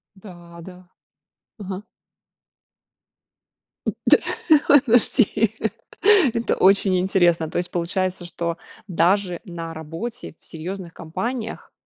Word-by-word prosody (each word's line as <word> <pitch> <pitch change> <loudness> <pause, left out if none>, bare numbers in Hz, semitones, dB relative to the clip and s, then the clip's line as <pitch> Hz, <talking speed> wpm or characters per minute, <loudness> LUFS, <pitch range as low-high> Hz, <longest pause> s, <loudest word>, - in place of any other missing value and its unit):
Да, 175 -3 -13
да. 180 +1 -13 0.7
Мгм. 195 0 -7 2.2
Да, - - +7 0.5
ох, 285 -2 +7
подожди, 225 -2 +2 0.8
это 230 0 0
очень 195 0 +4
интересно, 175 -3 +2
то - - -4
есть 175 0 -2
получается, 180 +1 -2
что 170 -1 -4 0.3
даже 180 +1 +1
на 165 -3 -7
работе 165 +9 -7
в - - -22
серьезных 175 +1 -7
компаниях 230 +8 -5
185 Hz, 95 wpm, -22 LUFS, 170-205 Hz, 2.2 s, Да